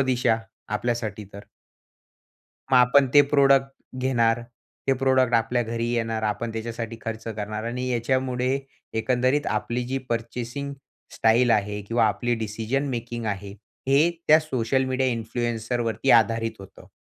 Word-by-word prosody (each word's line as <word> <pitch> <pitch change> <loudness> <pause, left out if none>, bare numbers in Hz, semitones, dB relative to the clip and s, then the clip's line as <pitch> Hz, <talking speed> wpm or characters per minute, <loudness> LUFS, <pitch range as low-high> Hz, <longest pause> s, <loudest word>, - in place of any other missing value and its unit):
दिशा 125 -4 +2 0.4
आपल्यासाठी 110 -3 -3
तर. 100 - -7 1.3
मग - - +7
आपण 125 +3 +5
ते 145 - +10
प्रॉडक्ट 135 -1 +5 0.3
घेणार. 120 -3 +2 0.5
ते - - +6
प्रॉडक्ट 130 -2 +3
आपल्या 115 +1 +2
घरी 115 +1 -3
येणार. 115 -2 -1
आपण 110 +2 -2
त्याच्यासाठी 115 0 -5
खर्च 110 0 -5
करणार. 110 0 -4
आणि 125 +2 -3
याच्यामुळे 130 +2 0 0.4
एकंदरीत 130 +5 +1
आपली 120 +3 -3
जी 135 +2 -2
पर्चेसिंग 120 +4 -4 0.4
स्टाईल 115 +2 +3
आहे 105 -1 +1
किंवा 115 +3 +1
आपली 120 +3 0
डिसिजन 110 +6 -2
मेकिंग 120 -2 -4
आहे, 100 -1 -3 0.4
हे 145 +5 +4 0.2
त्या 155 +1 +8
सोशल 130 -3 0
मीडिया 130 0 0
इन्फ्लुएन्सर 120 +1 -2
वरती 115 +3 0
आधारित 115 0 +4
होतं. 95 0 -14
120 Hz, 135 wpm, -25 LUFS, 115-130 Hz, 1.3 s, ते